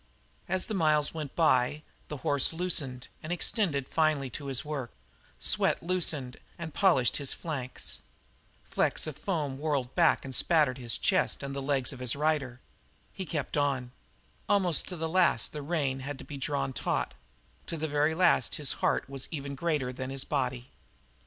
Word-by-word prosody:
As 185 -1 +1
the 220 - -4
miles 155 -5 +3
went 155 -4 -5
by 150 -2 +3 0.2
the 150 - -5
horse 145 0 +4
loosened 150 -8 -1
and 160 0 -6
extended 165 - +1
finely 155 -5 +1
to 140 +3 -6
his 135 +1 0
work; 140 -5 -3 0.5
sweat - - +1
darkened 160 -8 0 0.2
and 165 -2 -6
polished 165 - +4
his 140 -3 -1
flanks; 130 -6 -4 0.6
flecks - - +1
of 155 - -5
foam 150 -5 -2
whirled 140 -4 -1
back 170 -5 +4
and 135 - -5
spattered 150 -4 +3
his 120 -3 -2
chest - - +1
and 140 0 -4
the 140 - -2
legs 135 -1 0
of 130 - -10
his 125 0 +1
rider; 145 -4 0 0.5
he 190 -2 -5
kept 150 -3 -2
on; 135 -4 0 0.6
almost 185 -6 +3
to 180 - -5
the 165 -1 -2
last 180 +2 +2
the 150 - -4
rein 140 -4 -1
had 135 +1 -5
to - - -10
be 145 - -7
drawn 135 -1 -1
taut; - - -1 0.5
to 165 - -3
the 160 +1 -1
very 150 +1 +2
last 180 0 +3
his 150 -4 +1
heart - - +2
was 135 -1 -4
even 140 -2 -4
greater 140 -4 -1
than 130 +1 -4
his 135 0 -1
body. 130 -4 -2
145 Hz, 170 wpm, -30 LUFS, 135-160 Hz, 0.6 s, horse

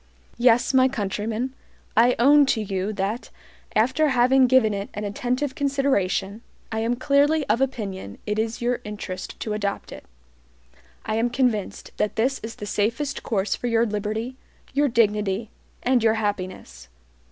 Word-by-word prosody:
Yes, 245 +1 +4
my 260 0 +6
countrymen, 225 +1 -3 0.4
I 240 +2 +5
own 285 +4 +6
to 245 - +2
you 195 0 -2
that, 205 +4 -3 0.5
after 260 +8 +3
having 260 0 +4
given 245 -4 +4
it 200 0 -4
an 210 - -4
attentive 250 +7 -2
consideration, 265 -8 0 0.3
I 220 - -1
am 230 +2 0
clearly 285 +3 +2
of 225 +5 +1
opinion 200 - -3
it 210 0 -1
is 225 +1 -2
your 245 0 0
interest 205 -3 -6
to 215 - -2
adopt 205 -1 -3
it. - - -10 1.0
I 220 - -1
am 235 +2 +1
convinced 240 -5 -1
that 210 - -1
this 260 +5 +1
is 225 +1 -7
the 210 - -7
safest 230 +8 -1
course 205 -2 -1
for 245 - -4
your 230 0 +3
liberty, 215 +4 -3 0.4
your 290 +2 +3
dignity, 210 -3 +1 0.3
and 250 -1 +3
your 225 -1 +4
happiness. 185 - -4
225 Hz, 150 wpm, -24 LUFS, 210-255 Hz, 1.0 s, my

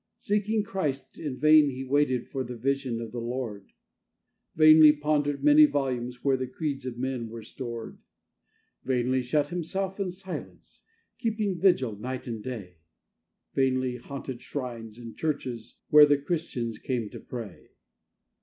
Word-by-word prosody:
Seeking 210 +1 0
Christ, 155 -10 -3
in 145 -5 -4
vain 155 -1 +6
he 130 0 -5
waited 130 -2 +1
for 135 - -3
the 125 -1 -7
vision 130 -1 -1
of 115 -1 -6
the 120 - -4
Lord; 115 -4 -5 0.8
Vainly 155 -1 +8
pondered 150 -1 0
many 300 +1 +8
volumes 125 - -2
where 135 -1 +3
the 130 0 -3
creeds 135 0 -4
of 120 -2 -5
men 125 -2 -3
were 115 0 -8
stored; 120 -2 -7 0.8
Vainly 130 0 +1
shut 145 +4 0
himself 190 +3 -3
in 195 -2 -1
silence, 185 +1 -9 0.4
keeping 215 -5 -1
vigil 160 - +3
night 130 +3 -5
and 115 -3 -5
day; 100 -9 -7 0.8
Vainly 130 -2 +1
haunted 130 0 -7
shrines 120 -5 -6
and 115 -2 -9
churches 125 -7 -3
where 150 0 +9
the 145 0 +4
Christians 140 -7 -3
came 120 -4 -2
to - - -8
pray. 115 -7 -8
130 Hz, 145 wpm, -27 LUFS, 120-155 Hz, 0.8 s, where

